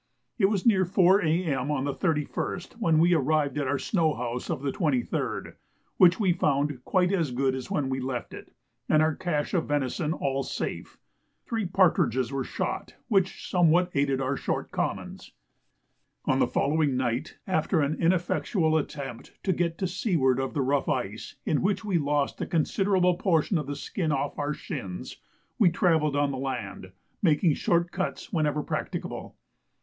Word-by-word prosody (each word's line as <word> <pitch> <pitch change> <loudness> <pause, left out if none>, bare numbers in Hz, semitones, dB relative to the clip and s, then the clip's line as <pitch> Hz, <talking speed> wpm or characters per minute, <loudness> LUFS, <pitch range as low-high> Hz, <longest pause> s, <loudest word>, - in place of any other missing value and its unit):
It 195 - +5
was 195 -2 +1
near 200 -5 +5
4 190 +2 +4
A.M. 155 -5 0
on 145 -3 0
the 140 0 -1
31st 170 - -2
when 165 -8 +3
we 170 +3 +5
arrived 150 -1 +1
at 140 - -1
our 140 +1 +1
snow 160 -2 +1
house 120 0 -4
of 155 -5 -3
the 140 - 0
23rd, 140 -8 -1 0.4
which 180 +1 +6
we 190 -5 +3
found 145 -5 0
quite 185 -2 +2
as 165 -7 +1
good 130 +1 0
as 130 -2 -5
when 145 -3 0
we 130 0 -2
left 130 -2 -4
it - - -10 0.4
and 155 0 +5
our 160 0 +2
cache 150 -3 -2
of 175 -4 +1
venison 145 +2 -1
all 135 -4 -1
safe. - - -5 0.5
Three 225 -4 -2
partridges 160 - +2
were 135 -1 -1
shot, - - -4
which 195 -4 +1
somewhat 175 0 +3
aided 140 -1 +1
our 135 +1 0
short - - -3
commons. - - -4 0.9
On - - +2
the - - +3
following 145 -2 +1
night, 125 +3 -2
after 170 -1 +1
an 145 +1 +1
ineffectual 170 -1 +1
attempt 140 -5 -7
to 190 - +2
get 170 -1 -1
to 190 - -1
seaward 170 - +1
of 135 +3 -3
the 140 - +1
rough 140 +3 +1
ice, 115 -7 -3
in 150 - +1
which 205 +3 0
we 190 -5 +1
lost 145 -1 0
a - - -2
considerable 180 +2 +2
portion 170 -1 +2
of 150 - -5
the 145 - -3
skin 155 +3 -2
off 140 0 -2
our 145 +1 -1
shins, 95 - -6 0.4
we 200 -6 +6
travelled 160 -4 +2
on 145 0 +2
the 130 - -4
land, 120 -8 -5 0.3
making 160 -2 +3
short 170 +3 +1
cuts 185 0 -4
whenever 150 -3 +1
practicable. - - -4
155 Hz, 170 wpm, -27 LUFS, 135-175 Hz, 0.9 s, which